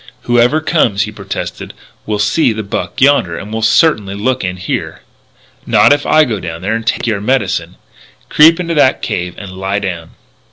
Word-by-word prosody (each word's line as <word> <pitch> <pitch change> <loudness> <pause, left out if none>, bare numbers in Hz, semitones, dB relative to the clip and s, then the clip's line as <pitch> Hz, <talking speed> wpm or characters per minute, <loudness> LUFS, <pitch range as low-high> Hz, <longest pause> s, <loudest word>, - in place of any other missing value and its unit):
"Whoever 120 +6 +2
comes," 120 - +1
he - - -6
protested, - - -7 0.3
"will 105 -1 -1
see 110 +5 +1
the 110 0 -5
buck 100 - -5
yonder, 130 -12 +3
and 105 +2 -8
will 110 - -2
certainly 110 -4 +2
look 130 +5 -1
in 90 0 -3
here 90 - -5 0.3
" - - -37 0.3
"Not 110 +6 +5
if 145 0 -2
I 155 - +5
go 110 -6 -3
down 85 -1 -7
there 100 - -1
and 115 0 -4
take - - 0
your 110 -4 -1
medicine. 130 +5 -1 0.5
Creep 160 +3 +5
into 170 -1 -2
that 140 -4 +2
cave 90 0 -3
and 100 -2 -8
lie 95 +2 -3
down." 90 -5 -5
110 Hz, 190 wpm, -14 LUFS, 95-135 Hz, 0.5 s, Not